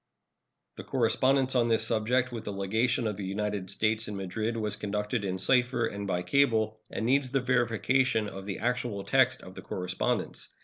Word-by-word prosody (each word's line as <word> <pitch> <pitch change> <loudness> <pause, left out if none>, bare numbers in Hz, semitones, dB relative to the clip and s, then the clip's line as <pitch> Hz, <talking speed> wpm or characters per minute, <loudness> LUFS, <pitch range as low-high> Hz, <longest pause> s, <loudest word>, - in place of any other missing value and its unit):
The - - -7
correspondence 130 +2 +2
on 120 -2 +3
this 115 -1 +2
subject 120 +3 +1
with 115 -2 -6
the - - -3
legation 110 +5 0
of 105 -3 -2
the 100 - -5
United 100 0 -3
States 110 0 +1
in 105 - -5
Madrid 110 +4 -3
was 105 -2 -2
conducted 105 +1 -2
in 95 -1 -2
cipher 120 +4 +2
and 100 -2 -4
by 90 -2 -1
cable, 110 -1 +2
and 110 - -3
needs 135 +2 +2
the 135 +1 +1
verification 125 -1 +1
of 95 -1 -8
the 100 - -3
actual 120 -3 -2
text 130 +1 +2
of 95 - -11
the - - -9
correspondence. 90 0 -2
110 Hz, 180 wpm, -29 LUFS, 100-125 Hz, -, on